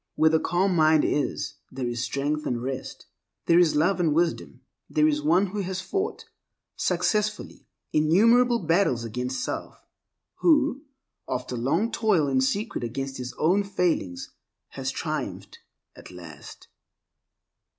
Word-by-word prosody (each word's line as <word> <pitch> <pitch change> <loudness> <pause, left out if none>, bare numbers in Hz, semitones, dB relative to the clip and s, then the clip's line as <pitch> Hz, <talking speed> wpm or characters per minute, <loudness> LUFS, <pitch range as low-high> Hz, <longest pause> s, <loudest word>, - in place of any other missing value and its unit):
Where 160 0 +4
the 160 - +3
calm 180 +3 +1
mind 155 -1 +4
is, 145 - -2
there 130 -1 -4
is 120 -1 -3
strength 145 +5 -2
and 120 - -1
rest, 130 0 -6 0.4
there 170 0 +5
is 170 -3 +3
love 175 +6 +2
and 160 -4 +2
wisdom. 165 -6 -1 0.3
There 150 0 +3
is 150 -1 +1
one 170 +6 +3
who 205 +2 -5
has 190 -1 -3
fought 390 - -3 0.5
successfully 210 -1 -1 0.3
innumerable 230 +11 +4
battles 165 - +1
against 125 +3 -3
self, - - -5 0.6
who, 295 -4 +3 0.5
after 125 0 -3
long 160 - 0
toil 210 -10 +2
in 135 -1 +2
secret 200 - -1
against 135 +3 -4
his 125 0 -6
own 185 +6 +2
failings, 175 - -2 0.4
has - - -4
triumphed - - -5 0.4
at - - -13
last. 85 -5 -12
160 Hz, 135 wpm, -25 LUFS, 130-195 Hz, 0.6 s, there